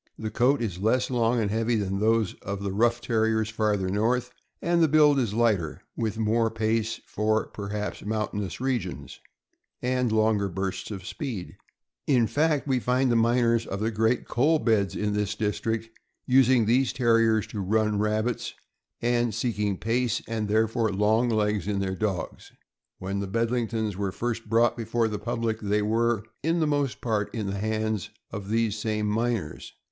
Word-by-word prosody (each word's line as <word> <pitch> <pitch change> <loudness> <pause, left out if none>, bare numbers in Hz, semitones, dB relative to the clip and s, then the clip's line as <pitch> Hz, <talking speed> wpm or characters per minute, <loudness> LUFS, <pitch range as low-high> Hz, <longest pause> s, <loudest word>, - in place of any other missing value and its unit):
The 110 -1 -4
coat 125 +3 +2
is 95 -6 -3
less 125 +5 +1
long 120 -1 +2
and 105 -3 0
heavy 115 +2 +1
than 100 -2 -1
those 110 -1 +2
of 100 0 -5
the 100 - -2
rough 120 +4 +2
Terriers 110 -2 +1
farther 105 -3 0
north, 115 +6 0 0.3
and 170 0 +1
the 160 - +5
build 150 -1 +5
is 110 -5 -1
lighter, 105 -9 +1
with 110 -2 -2
more 115 +1 +2
pace 110 0 -1
for, 110 +1 0
perhaps, 105 0 -5
mountainous 105 -2 -3
regions, 130 -2 -3 0.6
and 125 -1 0
longer 110 -2 +2
bursts 95 +1 -4
of 95 -4 -7
speed; 105 -3 -5 0.5
in 125 -4 +4
fact, 150 +5 +1
we 130 -2 +2
find 125 +1 +1
the - - +2
miners 115 0 +2
of 100 - -4
the 110 +2 0
great 110 +3 +1
coal 150 +7 +3
beds 110 -8 +1
in 105 -1 -1
this 105 -1 -1
district 110 +1 -2 0.4
using 130 -2 +4
these 125 +3 +3
Terriers 115 -4 +3
to 110 - -5
run 105 +2 +1
rabbits, 110 +3 -1 0.5
and 120 -2 +1
seeking 105 -4 -1
pace, 115 +2 0
and 110 -2 -2
therefore 110 +1 +1
long 110 +5 +2
legs, 105 -4 0
in 105 -1 0
their 95 -1 -1
dogs. 95 -4 -3 0.5
When 95 +1 -3
the 100 - -3
Bedlingtons 115 -1 -1
were 100 0 -2
first 115 +1 -4
brought 115 +2 +3
before 115 0 0
the 105 -2 -4
public, 115 0 -2
they 105 0 +1
were, 115 0 +1 0.2
in 165 +3 +1
the 160 - +2
most 145 -3 -1
part, 110 -4 -1
in 110 -3 -2
the 100 0 -3
hands 110 -2 -1 0.2
of 100 -1 -6
these 115 -1 +1
same 105 0 -2
miners. 110 -5 -2
110 Hz, 170 wpm, -26 LUFS, 105-120 Hz, 0.6 s, the